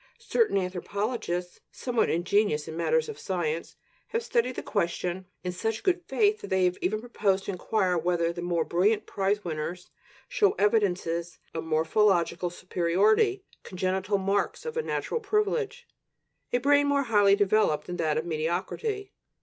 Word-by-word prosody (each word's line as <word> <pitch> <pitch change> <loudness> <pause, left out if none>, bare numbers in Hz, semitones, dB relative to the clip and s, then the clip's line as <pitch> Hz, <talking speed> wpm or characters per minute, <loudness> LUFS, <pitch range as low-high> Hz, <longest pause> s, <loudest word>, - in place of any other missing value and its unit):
Certain 460 - +1
anthropologists, 185 0 -3
somewhat 245 -3 0
ingenious 175 -2 +1
in 160 - -6
matters 475 - +1
of 445 - -7
science, 170 -3 -2 0.3
have 460 +1 -2
studied 250 - 0
the - - -5
question 180 -1 -2 0.2
in 180 - -2
such 220 +5 -3
good 365 -1 +2
faith 430 0 +2
that - - -7
they 190 -1 +2
have 180 0 0
even 215 +4 0
proposed 205 -5 0
to - - -2
inquire 185 0 0
whether 170 0 +1
the 175 - -6
more 175 -2 0
brilliant 205 +5 +2
prize 200 +1 -1
winners 170 +2 -4 0.4
show 485 -5 +3
evidences 180 -5 0 0.2
of 160 0 -4
morphological 170 +2 +2
superiority, 195 - +2 0.2
congenital 190 +2 -1
marks 195 - -1
of 470 -1 -4
a 475 - +1
natural 470 - -2
privilege, 450 +3 -1 0.6
a - - +3
brain 285 +3 +4
more 285 0 +2
highly 205 -5 +4
developed 205 -5 +2
than 180 - -5
that 155 -2 0
of 160 - -1
mediocrity. 185 - -2
195 Hz, 150 wpm, -27 LUFS, 175-245 Hz, 0.6 s, brain